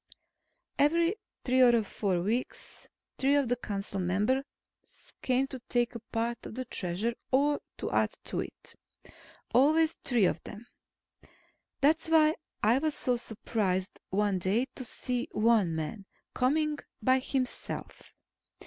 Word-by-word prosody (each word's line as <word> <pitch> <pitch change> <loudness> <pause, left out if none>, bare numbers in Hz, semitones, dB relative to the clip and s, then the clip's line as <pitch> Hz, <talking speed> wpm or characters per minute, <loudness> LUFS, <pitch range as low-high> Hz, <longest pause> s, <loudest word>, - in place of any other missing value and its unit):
Every 335 +6 +3 0.3
three 255 0 +3
or 240 -3 +6
four 195 -3 -1
weeks, 225 +7 -3 0.3
three 275 +2 +3
of 285 -3 +2
the 245 - +3
council 200 -4 -4
members 205 +9 +1 0.8
came 260 +1 +2
to 265 - -7
take 240 0 +1
a 235 - -6
part 235 +1 -2
of - - -9
the 255 - -3
Treasure, 200 +2 -1 0.2
or 285 +2 +3 0.2
to - - -4
add - - +2
to - - -3
it. - - -7 0.8
Always 310 +6 +4
three 240 -6 +2
of - - 0
them. 215 +3 -10 1.2
That's 315 +3 +3
why 310 -1 +5 0.3
I 230 +5 +4
was 310 0 0
so 250 - +1
surprised 205 -5 -2
one 200 -1 +1
day, 200 +8 +1
to 260 - -6
see 245 0 -3
one 215 -6 +3
man 190 +6 -5 0.3
coming 300 +3 +1 0.2
by 260 +3 +4
himself. 260 -1 -4
245 Hz, 135 wpm, -30 LUFS, 210-270 Hz, 1.2 s, or